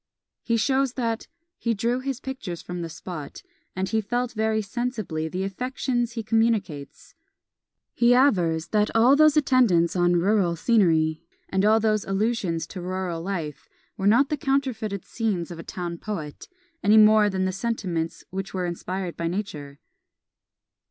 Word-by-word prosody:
He 230 -1 0
shows 265 +2 +1
that 230 -3 -2 0.3
"He 230 -1 0
drew 235 +4 0
his 265 -1 -4
pictures 260 -11 -6
from 180 0 -5
the 165 - -4
spot, 165 -3 -8 0.3
and, 190 0 -1
he 220 +2 0
felt 245 +3 -2
very 220 0 0
sensibly 210 -8 -3
the 180 +4 -3
affections 240 +3 -2
he 230 -2 -4
communicates." 215 -10 -1 0.8
He 240 +1 +4
avers 175 - +2
that 210 0 +2
all 240 +5 +6
those 310 0 +5
attendants 235 - +3
on 175 -1 +3
rural 180 -1 +2
scenery, 165 -6 +2 0.3
and 190 0 +1
all 215 +2 +5
those 215 -1 +1
allusions 195 -4 -1
to 185 - -7
rural 180 -2 -3
life, 165 -5 -5 0.3
were 195 -2 -1
not 245 +7 +4
the 300 - -1
counterfeited 255 -8 -1
scenes 200 -7 -2
of 170 - -8
a - - -7
town 175 -2 -5
poet, 165 -9 -6 0.3
any 210 +2 +5
more 215 -1 +6
than 190 -1 -1
the 185 - 0
sentiments, 185 -6 -3
which 195 +1 -5
were 180 -1 -1
inspired 180 +1 -4
by 170 - -2
Nature. 155 -7 -5
205 Hz, 155 wpm, -25 LUFS, 175-235 Hz, 0.8 s, all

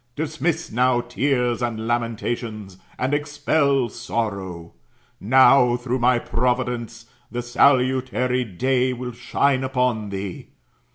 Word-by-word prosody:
Dismiss 160 +2 -2
now 125 +1 +2
tears 125 0 0
and 115 -2 -2
lamentations, 115 -4 -3 0.2
and 130 +3 -1
expel 145 -2 +1
sorrow. 100 -7 -4 0.5
Now, 125 +2 +5
through 125 +1 -2
my 125 +1 +3
providence, 120 -1 -2 0.2
the 120 0 -4
salutary 125 0 +2
day 125 +5 0
'will 125 0 -5
shine 130 +3 0
upon 125 -5 0
thee. 95 -1 -6
125 Hz, 105 wpm, -22 LUFS, 115-130 Hz, 0.5 s, Now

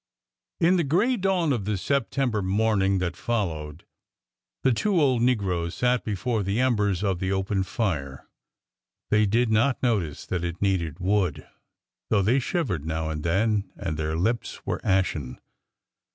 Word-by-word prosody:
In 180 +1 +4
the 170 - +2
gray 190 - +2
dawn 185 - +1
of 110 -6 -2
the 105 -1 -1
September 125 0 0
morning 100 0 +2
that 90 -2 -2
fol 110 -2 -1
lowed, 75 0 -8 0.8
the 130 - +4
two 195 - +1
old 130 -6 +3
negroes 95 -9 0
sat 125 -1 +1
before 110 +2 -1
the 100 +3 -1
embers 105 -7 +1
of 95 -4 0
the 95 +1 -1
open 95 0 0
fire. 85 - -3 0.8
They 105 0 +4
did 115 +3 +2
not 120 +5 +2
notice 100 - 0
that 90 -2 -2
it 85 0 -4
needed 90 -6 0
wood, 95 0 0 0.6
though 100 -3 +3
they 120 +8 +3
shivered 125 - -1
now 80 0 -2
and 75 -1 -4
then 100 +2 +1
and 85 -6 -4
their 80 +1 -2
lips 115 +7 -2
were - - -2
ashen. 90 -9 0
100 Hz, 155 wpm, -25 LUFS, 90-120 Hz, 0.8 s, In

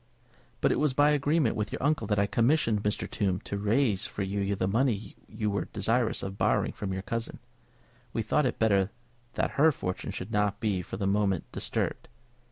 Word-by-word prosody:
"But - - +3
it - - +1
was 145 -3 +1
by 145 +1 +5
agreement 145 -3 +2
with 105 -1 -2
your - - -4
uncle 145 -7 +1
that 105 - +1
I 100 - +3
commissioned 115 -1 +2
Mr. 105 0 -1
Tombe 95 -3 -1
to - - -4
raise 105 0 +1
for 100 - -4
you 100 +1 -1
the 95 - 0
money 110 0 0
you 105 -1 -2
were 100 -3 -1
desirous 115 +3 0
of 95 0 -5
borrowing - - +2
from 100 -2 -5
your 95 0 -3
cousin. 115 +2 -4 0.7
We 115 - -1
thought 145 +5 +2
it 125 - -3
better 100 -4 +3 0.4
that - - -1
her 160 +1 +7
fortune 90 -9 -4
should 95 +4 -6
not 105 -1 +1
be 100 -4 0
for 90 - -7
the 100 - -2
moment 100 -2 +1
disturbed." - - -2
105 Hz, 195 wpm, -29 LUFS, 100-120 Hz, 0.7 s, her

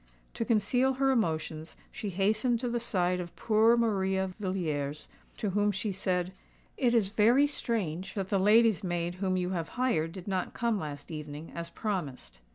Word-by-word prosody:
To - - -2
conceal 245 +4 +2
her 270 +1 +2
emotions, 160 -8 -1
she 215 -4 -5
hastened 215 +6 +1
to 250 - -1
the 240 0 -1
side 180 -6 0
of 175 -1 -7
poor 225 +2 +4
Maria 190 -4 +1
Villiers, 155 -7 -2 0.3
to 210 - -1
whom 205 +2 +2
she 205 +2 -2
said, 180 -1 -1 0.4
"It 245 -3 +2
is 210 -4 +3
very 230 +7 +4
strange 195 - -2
that 195 -2 -3
the 200 - +3
lady's 215 0 +4
maid 175 -1 -1
whom 185 -1 +1
you 180 0 -1
have 165 -3 -3
hired 170 -11 +1
did 185 -1 -9
not 190 -2 -2
come 235 -3 0
last 145 -1 -6
evening, 150 0 -7
as 170 0 -5
promised." 170 - -4
195 Hz, 170 wpm, -30 LUFS, 175-225 Hz, 0.4 s, poor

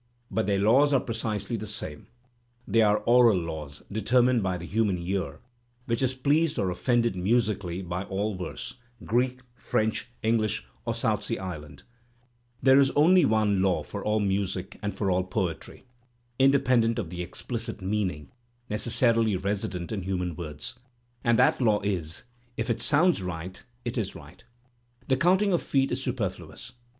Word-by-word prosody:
But 110 +2 0
their 100 -1 +2
laws 130 +9 +4
are 135 - +5
precisely 110 -2 -3
the 110 0 -6
same; 80 -8 -6 0.6
they 115 - +3
are 105 -1 +3
aural 120 -3 +6
laws, 80 -4 -6
determined 120 +3 +3
by 95 -2 -1
the 85 - -7
human 105 -1 +1
ear, 85 -5 -3 0.4
which 115 0 -1
is 130 0 +1
pleased 150 +4 +2
or 95 -2 0
offended 120 +2 +1
musically 95 -2 0
by 90 +2 -4
all 100 +3 -2
verse, 90 +6 -6 0.3
Greek, 125 +2 0
French, 110 -2 -1
English, 110 -2 +1 0.2
or - - -1
South - - 0
Sea - - -2
Island, 75 -7 -7 0.8
There 135 +1 +7
is 135 -1 +5
only 175 +3 +6
one 105 -4 +2
law 95 -1 +1
for - - -7
all 105 0 +1
music 95 -2 -2
and 105 -1 -2
for 100 -3 0
all 90 0 +2
poetry 95 +1 -4 0.5
(independent 125 -4 +4
of 90 -8 -3
the 90 0 -4
explicit 115 +5 -4
meaning 95 -7 -2 0.4
necessarily 115 0 +2
resident 95 -2 -3
in 105 -3 -2
human 90 -2 -2
words), 75 - -5 0.4
and 120 -1 +3
that 155 +5 +4
law 110 -4 +3
is: 90 -6 -3 0.3
if 115 +2 -1
it 115 -1 -2
sounds 150 - +3
right, 90 0 -6 0.2
it 120 +1 -2
is 105 - -3
right. - - -13 0.6
The 130 - +3
counting 190 +5 +3
of 175 - +2
feet 135 -1 +1
is 125 - -1
superfluous. 105 - -4
105 Hz, 160 wpm, -27 LUFS, 95-120 Hz, 0.8 s, There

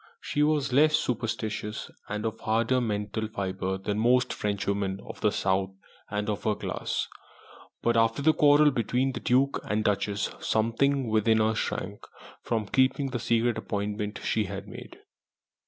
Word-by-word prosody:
She 145 - -2
was 150 -3 +2
less 155 +3 +5
superstitious 110 -4 -3 0.2
and 105 +1 -3
of 110 - -3
harder 115 +4 +1
mental 105 -1 -2
fibre 95 -2 -3
than 100 +2 -2
most 125 +2 +3
Frenchwomen 100 -1 -2
of - - -9
the 105 - +3
south 95 -1 0 0.4
and 105 0 -2
of 105 -2 -2
her 105 - +1
class; - - -3 0.8
but 120 0 +2
after 115 +4 +2
the 155 +1 +5
quarrel 150 0 +5
between 125 +2 0
the - - -5
Duke 135 +3 +2
and 105 +1 -1
Duchess 105 0 0
something 125 +4 +1
within 110 0 +3
her 110 0 +2
shrank 105 -2 -3 0.4
from 115 -2 -1
keeping 130 +4 +1
the 120 - -2
secret 115 0 +1
appointment 105 0 -3
she 110 - +1
had 100 +1 -6
made. 95 - -10
110 Hz, 155 wpm, -27 LUFS, 105-125 Hz, 0.8 s, less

